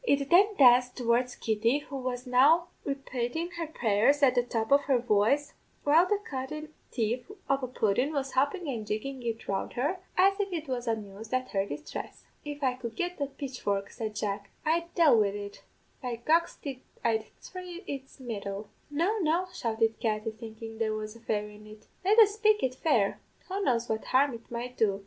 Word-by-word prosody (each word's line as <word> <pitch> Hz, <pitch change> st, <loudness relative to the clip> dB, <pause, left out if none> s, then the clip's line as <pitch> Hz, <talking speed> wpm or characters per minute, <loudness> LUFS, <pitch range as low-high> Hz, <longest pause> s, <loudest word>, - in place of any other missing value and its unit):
It 280 Hz, -, +1 dB
then 400 Hz, +4 st, +6 dB
danced 250 Hz, -4 st, +6 dB
towards 245 Hz, 0 st, +1 dB
Kitty, 225 Hz, +4 st, +1 dB
who 290 Hz, -1 st, -8 dB
was 250 Hz, -1 st, -3 dB
now 295 Hz, +8 st, +5 dB, 0.2 s
repatin' 275 Hz, +4 st, -3 dB
her 330 Hz, -, -2 dB
prayers 265 Hz, 0 st, +2 dB
at 260 Hz, -2 st, +6 dB
the 245 Hz, -, +3 dB
top 230 Hz, -1 st, -2 dB
of 285 Hz, 0 st, +5 dB
her 270 Hz, -3 st, +3 dB
voice, 245 Hz, +5 st, +2 dB, 0.3 s
while 320 Hz, +5 st, +5 dB
the 415 Hz, -, +2 dB
cunnin' 300 Hz, +3 st, -5 dB, 0.2 s
thief 240 Hz, -, -1 dB, 0.2 s
of 275 Hz, 0 st, +2 dB
a 255 Hz, -, -2 dB
pudden 245 Hz, +3 st, +1 dB
was 275 Hz, -3 st, -2 dB
hoppin' 285 Hz, +6 st, +1 dB
and 230 Hz, -6 st, -3 dB
jiggin' 255 Hz, +6 st, -3 dB
it 230 Hz, -2 st, -4 dB
round 195 Hz, -1 st, -2 dB
her, 295 Hz, +10 st, -1 dB, 0.2 s
as 390 Hz, +2 st, +4 dB
if 400 Hz, -1 st, -1 dB
it 320 Hz, -3 st, -3 dB
was 250 Hz, -2 st, -3 dB
amused 220 Hz, +1 st, -3 dB
at 255 Hz, 0 st, -1 dB
her 195 Hz, -1 st, 0 dB
distress. 305 Hz, -, -7 dB, 0.2 s
"'If 290 Hz, 0 st, -6 dB
I 255 Hz, -2 st, +3 dB
could 235 Hz, -3 st, -7 dB
get 355 Hz, +5 st, -3 dB
the 280 Hz, -, 0 dB
pitchfork,' 255 Hz, -8 st, -3 dB
said 220 Hz, -3 st, -5 dB
Jack, 200 Hz, -1 st, -3 dB, 0.2 s
'I'd 335 Hz, +2 st, +1 dB
dale 310 Hz, -9 st, +6 dB
wid 200 Hz, -1 st, +2 dB
it 205 Hz, 0 st, -7 dB, 0.4 s
by 250 Hz, -3 st, -3 dB
goxty 310 Hz, -4 st, +1 dB, 0.3 s
I'd 220 Hz, -1 st, +2 dB
thry 360 Hz, -1 st, -8 dB
its 275 Hz, -4 st, -7 dB
mettle.' 205 Hz, -4 st, -5 dB, 0.2 s
"'No, 345 Hz, +9 st, +1 dB
no,' 350 Hz, +2 st, +1 dB
shouted 225 Hz, -5 st, 0 dB
Katty, 215 Hz, 0 st, -1 dB
thinkin' 225 Hz, 0 st, -9 dB
there 220 Hz, -1 st, 0 dB
was 215 Hz, 0 st, -5 dB
a -, -, -13 dB
fairy 210 Hz, -2 st, -3 dB
in 210 Hz, 0 st, -14 dB
it; 215 Hz, 0 st, -13 dB, 0.2 s
'let 405 Hz, +4 st, +4 dB
us 420 Hz, -3 st, +8 dB
spake 430 Hz, 0 st, +3 dB
it 255 Hz, -, +1 dB
fair. 250 Hz, -8 st, +1 dB, 0.3 s
Who 395 Hz, +2 st, -2 dB
knows 240 Hz, -5 st, +1 dB
what 220 Hz, 0 st, -2 dB
harm 270 Hz, +1 st, +3 dB
it 230 Hz, 0 st, -10 dB
might 245 Hz, +1 st, -5 dB
do? 200 Hz, -3 st, +2 dB
255 Hz, 190 wpm, -29 LUFS, 220-300 Hz, 0.4 s, us